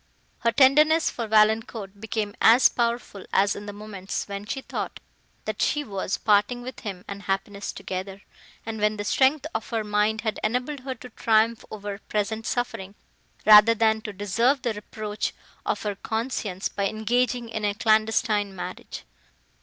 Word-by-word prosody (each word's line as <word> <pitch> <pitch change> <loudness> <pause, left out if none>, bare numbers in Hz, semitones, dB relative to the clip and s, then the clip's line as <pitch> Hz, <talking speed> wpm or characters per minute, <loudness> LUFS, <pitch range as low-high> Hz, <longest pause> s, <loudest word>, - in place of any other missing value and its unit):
Her 235 - +2
tenderness 300 +6 +5
for 230 -2 -4
Valancourt 215 -2 +2
became 220 -2 -2
as 235 +3 +7
powerful 235 -4 -2
as 200 +1 +3
in 205 +1 -8
the - - -4
moments, 205 -2 -5
when 200 0 -6
she 270 - -3
thought, - - -5 0.5
that 215 -1 -3
she 295 -1 +1
was 195 -5 -3
parting 215 +3 +2
with 255 +1 -7
him 195 -4 -7
and 200 0 -6
happiness 200 +1 -3
together, 190 +1 -6 0.4
and 220 -1 -5
when 210 0 +2
the 205 - -3
strength 265 +7 +2
of 225 - -4
her 225 -2 -1
mind 210 +1 +1
had 220 -1 -2
enabled 250 +6 -1
her 260 0 -5
to 250 +1 -11
triumph 225 0 +2
over 205 -1 -6
present 215 +1 -2
suffering, 205 -5 -3 0.5
rather 215 +2 +9
than 220 0 +2
to 215 - -6
deserve 230 +7 +1
the 235 - 0
reproach 210 0 -4 0.3
of - - -1
her 210 -1 -1
conscience 220 -2 -3
by 200 0 -1
engaging 240 +3 0
in 220 -1 -4
a 205 -1 0
clandestine 215 -2 +2
marriage. 180 - -7
215 Hz, 160 wpm, -25 LUFS, 205-235 Hz, 0.5 s, rather